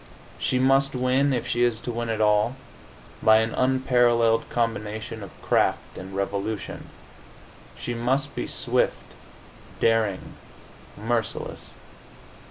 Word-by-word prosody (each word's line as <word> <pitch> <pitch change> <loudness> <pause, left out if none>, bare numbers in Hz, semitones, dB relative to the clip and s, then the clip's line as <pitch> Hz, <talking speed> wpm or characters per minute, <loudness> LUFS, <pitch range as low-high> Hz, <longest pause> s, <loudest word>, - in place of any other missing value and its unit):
She 130 - 0
must 135 +1 +3
win, 130 +3 +2
if 125 -3 -1
she 120 - -1
is 120 -2 +2
to 120 - -4
win 120 0 -3
at 110 - -1
all, 105 +3 +3 0.7
by 110 0 +6
an 110 +1 +1
unparalleled 120 -3 +3
combination 110 -2 -2
of 100 - -11
craft - - +1
and 95 +1 -8
resolution. 100 +1 -3 0.9
She 120 - -4
must 130 +5 0
be - - -3
swift, - - -1 0.7
daring, 110 -4 +1 0.6
merciless. 115 +1 -3
115 Hz, 115 wpm, -25 LUFS, 110-125 Hz, 0.9 s, by